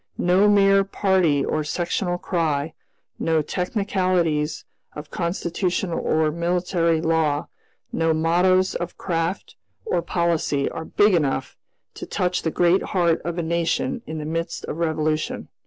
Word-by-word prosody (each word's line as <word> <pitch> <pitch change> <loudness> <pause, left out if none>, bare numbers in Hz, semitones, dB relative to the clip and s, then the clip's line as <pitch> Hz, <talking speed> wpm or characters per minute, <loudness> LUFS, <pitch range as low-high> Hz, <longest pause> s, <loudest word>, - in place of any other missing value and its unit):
No 185 +4 +3
mere 195 -1 +5
party 185 -7 +1
or 155 - -1
sectional 175 +3 -1
cry, 160 -4 -1 0.5
no 160 -2 +1
technicalities 180 -4 -1 0.3
of 150 0 -9
constitutional 175 +1 -2
or 155 -1 +1
military 170 0 0
law, 160 -3 0 0.4
no 165 0 +1
mottoes 180 +4 +2
of 175 0 -5
craft 165 +1 -3 0.3
or 305 - 0
policy 165 -5 0
are 160 - -6
big 205 +4 +3
enough 135 -5 0 0.4
to - - -8
touch 180 0 -1
the 160 - -1
great 175 +3 +3
heart 170 -3 +1
of 170 0 -4
a 170 - -1
nation 170 +8 -1
in 160 - -5
the 150 - -5
midst 165 +2 -3
of - - -5
revolution. 155 -2 -1
170 Hz, 135 wpm, -23 LUFS, 160-180 Hz, 0.5 s, mere